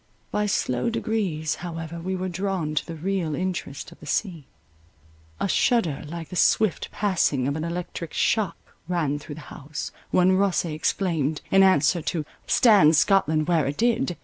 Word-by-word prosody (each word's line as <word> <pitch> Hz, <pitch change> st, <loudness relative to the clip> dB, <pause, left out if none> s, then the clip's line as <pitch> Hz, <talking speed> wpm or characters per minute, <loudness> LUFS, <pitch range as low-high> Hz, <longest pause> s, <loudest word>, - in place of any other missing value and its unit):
By 210 Hz, 0 st, 0 dB
slow 125 Hz, -, 0 dB
degrees 200 Hz, -9 st, -1 dB
however 165 Hz, -1 st, -6 dB
we 185 Hz, +3 st, -3 dB
were 185 Hz, 0 st, -3 dB
drawn 185 Hz, -3 st, -2 dB
to 150 Hz, -, 0 dB
the 165 Hz, -, -7 dB
real 170 Hz, -2 st, -2 dB
interest 180 Hz, -5 st, -4 dB
of -, -, -16 dB
the 150 Hz, -, -12 dB
scene. 165 Hz, 0 st, -2 dB, 0.9 s
A -, -, 0 dB
shudder 185 Hz, -, +1 dB
like 165 Hz, +1 st, -7 dB
the -, -, -7 dB
swift 215 Hz, +2 st, +2 dB
passing 170 Hz, -10 st, +1 dB
of 140 Hz, -, -1 dB
an 160 Hz, -, -3 dB
electric 170 Hz, -1 st, -5 dB
shock 205 Hz, -6 st, +1 dB, 0.3 s
ran 155 Hz, -5 st, 0 dB
through 145 Hz, 0 st, -9 dB
the 155 Hz, -, -10 dB
house, 145 Hz, +1 st, -6 dB, 0.2 s
when 180 Hz, +1 st, +4 dB
Rosse 195 Hz, -2 st, +2 dB
exclaimed, 155 Hz, -1 st, -1 dB
in 195 Hz, -, +6 dB
answer 180 Hz, -2 st, +4 dB
to 155 Hz, 0 st, -2 dB, 0.2 s
"Stands 195 Hz, -, +6 dB
Scotland 155 Hz, -3 st, +3 dB
where 165 Hz, -5 st, +2 dB
it 140 Hz, -, -3 dB
did?" 230 Hz, -7 st, +1 dB
170 Hz, 165 wpm, -25 LUFS, 155-190 Hz, 0.9 s, in